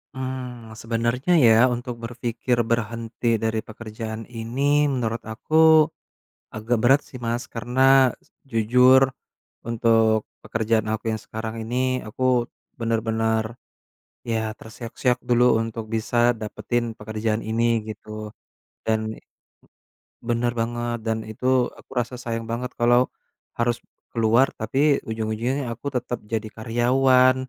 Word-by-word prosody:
Mmm, 125 -3 -6
sebenernya 120 +8 0
ya 115 - +7 0.2
untuk 120 0 -5
berpikir 120 +1 -2
berhenti 115 0 -1
dari 110 0 0
pekerjaan 110 0 -7
ini 115 +3 -6 0.3
menurut 115 -2 -2
aku, 155 +8 -4 1.0
agak 110 +3 0
berat 135 +4 +5
sih 125 - -9
Mas 120 +1 -1
karena, 120 +3 -3 0.7
jujur, 125 +4 +5 0.7
untuk 115 -2 +3 0.2
pekerjaan 110 -1 0
aku 110 -1 -3
yang 110 - -3
sekarang 110 0 -5
ini 120 +2 -4 0.3
aku, 120 - -7 0.6
bener-bener. 110 -1 0 0.9
Ya 115 - +1 0.2
terseok-seok 120 +2 -2
dulu 120 0 +4 0.2
untuk 115 0 -5
bisa 110 +2 -2 0.2
dapetin 110 +3 -2
pekerjaan 110 +1 -2
ini 115 +1 +1 0.3
gitu, 110 0 -9 0.8
dan 110 0 0 1.1
Bener 120 0 0
banget 120 0 -2
dan 110 0 -1
itu 125 +3 0
aku - - -20
rasa 125 0 -1
sayang 115 -2 -3
banget 115 +3 -4
kalo, 120 +1 +4 0.5
harus 120 0 0 0.3
keluar 115 +3 +3
tapi 135 +6 +1
ujung-ujungnya 115 +4 -2
aku 125 +5 -6
tetep 125 0 -2
jadi 110 0 -2
karyawan, 125 +3 +4
115 Hz, 115 wpm, -24 LUFS, 110-125 Hz, 1.1 s, ya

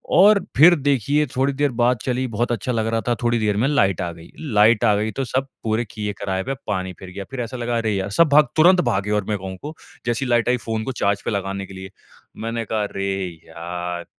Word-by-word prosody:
और 200 +3 +7 0.2
फिर 170 +5 +8
देखिए 145 0 +1
थोड़ी 135 +2 +1
देर 145 0 0
बात 120 -2 +2
चली 130 0 -1
बहुत 120 +1 -1
अच्छा 120 +1 -2
लग 110 -2 0
रहा 115 0 0
था। 120 - +2
थोड़ी 120 0 +2
देर 105 -2 0
में 120 +5 +2
लाइट 95 - +2
आ 85 -1 -2
गयी। 85 0 -14 0.2
लाइट 105 +2 +5
आ 105 -2 +4
गयी 105 +2 -1
तो 135 - -1
सब 130 +3 -1 0.2
पूरे 110 +2 0
किये 105 -1 -4
कराये 95 -1 -1
पे 135 - -3
पानी 95 -1 -2
फिर 95 - -9
गया, 100 +2 -7
फिर 135 -2 -4
ऐसा 120 +2 -5
लगा, 120 0 -1
"अरे 110 -2 0
यार" 95 0 -2
सब 170 -2 +6
भाग 145 -1 +6
तुरंत 180 +3 +6
भागे 100 +2 -1
और 105 -2 0
मैं 105 - 0
कहूँ 95 0 -7
को 155 +2 -7 0.3
जैसी 120 +3 0
लाइट 120 -2 +2
आई 125 - +3
फ़ोन 110 -1 -1
को 130 - -3
चार्ज 100 0 +1
पे - - -1
लगाने 100 -1 -3
के 95 - -12
लिए। 95 +1 -9 0.5
मैंने 115 0 -3
कहा, 110 0 -1
"अरे 100 -1 -3 0.4
यार।" 85 +1 -5
110 Hz, 240 wpm, -22 LUFS, 100-130 Hz, 0.5 s, फिर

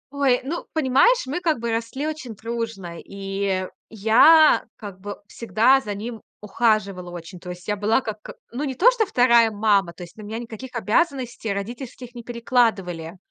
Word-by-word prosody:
Ой, 270 -3 +2
ну, 315 +6 -5
понимаешь, 315 - +3
мы 285 +7 -3
как 320 -5 +1
бы 235 0 -2
росли 230 +5 -3
очень 285 -8 -5
дружно. 220 -6 -5
И 195 -1 -3 0.2
я 230 +9 +6
как 200 -3 -10
бы 205 +1 -7
всегда 230 +6 +2
за 205 -3 -5
ним 225 +2 -6 0.2
ухаживала 210 -4 0
очень. 175 0 -9
То 180 - -10
есть, 180 +2 -9
я 210 - 0
была 210 +5 +1
как, 215 -3 -6
э, - - -7 0.2
ну, 250 +5 -4
не 270 -3 -3
то, 450 - +6
что 455 -4 0
вторая 235 - +4
мама. 205 -4 +2
То 175 - -11
есть, 175 - -13
на 220 - -11
меня 215 +2 -6
никаких 235 +2 -8
обязанностей 240 -1 0
родительских 240 +4 -6
не 240 - -8
перекладывали. 220 -8 -1
225 Hz, 175 wpm, -23 LUFS, 200-255 Hz, 0.2 s, я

